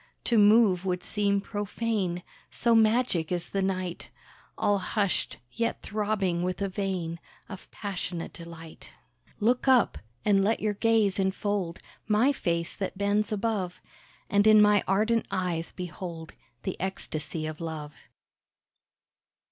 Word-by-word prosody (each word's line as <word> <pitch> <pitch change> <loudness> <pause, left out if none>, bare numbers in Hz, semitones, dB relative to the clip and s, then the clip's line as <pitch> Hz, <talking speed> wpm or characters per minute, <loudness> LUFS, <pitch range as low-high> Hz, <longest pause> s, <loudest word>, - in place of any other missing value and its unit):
to 235 - +1
move 205 -3 +5
would 180 -1 -2
seem 200 -1 +1
profane, 205 -3 -2 0.3
So 235 - +1
magic 220 -7 +3
is 175 -1 -2
the 195 - -1
night, 185 -2 -2 0.5
All 205 -1 +2
hushed, 200 0 -1
yet 230 - -2
throbbing 205 -4 -1
with 180 +1 -2
a 200 - 0
vein 185 -4 -3 0.3
Of 190 -2 -10
passionate 185 -4 -4
delight. 165 -1 -11 0.5
Look 245 +5 +2
up! 255 -4 +4 0.3
and 195 -2 +4
let 220 +3 +2
your 215 -1 0
gaze 215 -2 +2
enfold 190 -2 -1 0.3
My 220 +6 +4
face 170 -10 -1
that 195 -1 -4
bends 205 +2 +1
above, 205 -4 -1 0.5
And 205 +1 +3
in 215 0 +8
my 210 -1 +5
ardent 215 +4 +2
eyes 175 -3 -2
behold 170 -2 -7 0.3
The - - -4
ecstasy 160 -4 -3
of 155 +1 -6
love. 155 -2 -5
195 Hz, 130 wpm, -28 LUFS, 175-210 Hz, 0.5 s, in